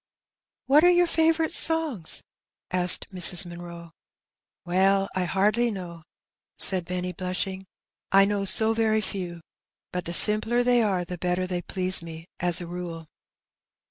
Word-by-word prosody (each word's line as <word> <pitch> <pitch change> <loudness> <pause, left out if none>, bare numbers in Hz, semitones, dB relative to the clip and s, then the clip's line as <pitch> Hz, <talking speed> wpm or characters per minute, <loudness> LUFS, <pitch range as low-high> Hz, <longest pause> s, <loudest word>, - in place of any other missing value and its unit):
" - - -68
What 295 +4 +4
are 355 - +6
your 355 0 +4
favourite 325 -1 +1
songs? 315 - +1 0.5
^^ - - +1
asked 180 -1 +4
Mrs. 180 0 +4
Munroe. 170 -1 -10 0.4
" - - -68
Well, 195 +2 +1
I 185 -1 -1
hardly 210 +6 +1
know,^' 175 -5 -8 0.6
said 185 -3 +3
Benny, 180 0 -4
blushing. 190 +1 -4 0.2
" - - -59
I 195 0 +5
know 200 0 -2
so 220 +3 +2
very 220 -1 0
few; 180 -5 -6 0.5
but 180 0 -5
the 170 - -4
simpler 220 +6 +3
they 245 -1 +2
are 190 -5 -1
the 180 0 -8
better 180 +1 -1
they 180 -1 -4
please 185 0 -1
me, 165 -1 -10
as 175 -1 +2
a 175 - -7
rule. 170 -1 -7
185 Hz, 160 wpm, -25 LUFS, 175-220 Hz, 0.6 s, are